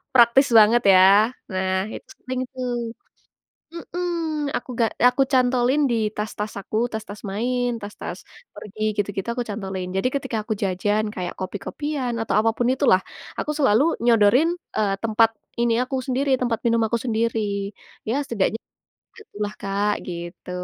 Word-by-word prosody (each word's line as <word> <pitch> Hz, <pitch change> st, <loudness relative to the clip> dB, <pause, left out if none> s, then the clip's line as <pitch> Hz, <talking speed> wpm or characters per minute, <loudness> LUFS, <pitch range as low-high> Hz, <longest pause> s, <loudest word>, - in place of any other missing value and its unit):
praktis 240 Hz, +3 st, +6 dB
banget 220 Hz, +3 st, +7 dB
ya. 200 Hz, +5 st, +6 dB, 0.2 s
Nah, 190 Hz, +2 st, -1 dB
itu -, -, -10 dB, 0.2 s
sering 255 Hz, 0 st, -3 dB
tuh 240 Hz, -2 st, -3 dB, 0.8 s
Mhm. 335 Hz, -4 st, -3 dB
Aku -, -, -9 dB
ga 230 Hz, -, +4 dB, 0.2 s
aku 250 Hz, +2 st, -1 dB
cantolin 255 Hz, +2 st, +3 dB
di 235 Hz, -, +2 dB, 0.2 s
tas-tas 210 Hz, 0 st, -4 dB
aku, 215 Hz, -, -4 dB
tas-tas 215 Hz, -1 st, -7 dB
main, 245 Hz, +3 st, -1 dB
tas-tas 205 Hz, 0 st, -7 dB, 0.4 s
pergi 215 Hz, +1 st, -10 dB
gitu-gitu, 200 Hz, -2 st, -2 dB
aku 245 Hz, 0 st, -2 dB
cantolin. 190 Hz, -3 st, -4 dB
Jadi, 195 Hz, +6 st, +1 dB
ketika 245 Hz, -4 st, -2 dB
aku 220 Hz, -, -1 dB
jajan, 205 Hz, +3 st, 0 dB
kayak 180 Hz, -1 st, -4 dB
kopi-kopian, 250 Hz, +7 st, -3 dB
atau 225 Hz, -, -1 dB
apapun 225 Hz, +2 st, +1 dB
itulah 190 Hz, -7 st, +3 dB, 0.4 s
aku 300 Hz, -, -1 dB
selalu 265 Hz, -3 st, +4 dB, 0.2 s
nyodorin, 235 Hz, +7 st, +5 dB, 0.3 s
eee, 200 Hz, -2 st, +1 dB
tempat 225 Hz, 0 st, +4 dB, 0.3 s
ini 235 Hz, -1 st, +2 dB
aku 260 Hz, +1 st, -4 dB
sendiri, 270 Hz, +2 st, 0 dB
tempat 235 Hz, -3 st, 0 dB
minum 230 Hz, 0 st, +3 dB
aku 235 Hz, -, -1 dB
sendiri. 230 Hz, -1 st, 0 dB, 0.7 s
Ya, 230 Hz, -, 0 dB
setidaknya 225 Hz, -3 st, -1 dB, 0.6 s
gitulah 210 Hz, -, -6 dB
Kak, 200 Hz, +1 st, 0 dB
gitu. 175 Hz, 0 st, -7 dB
225 Hz, 140 wpm, -23 LUFS, 205-250 Hz, 0.8 s, banget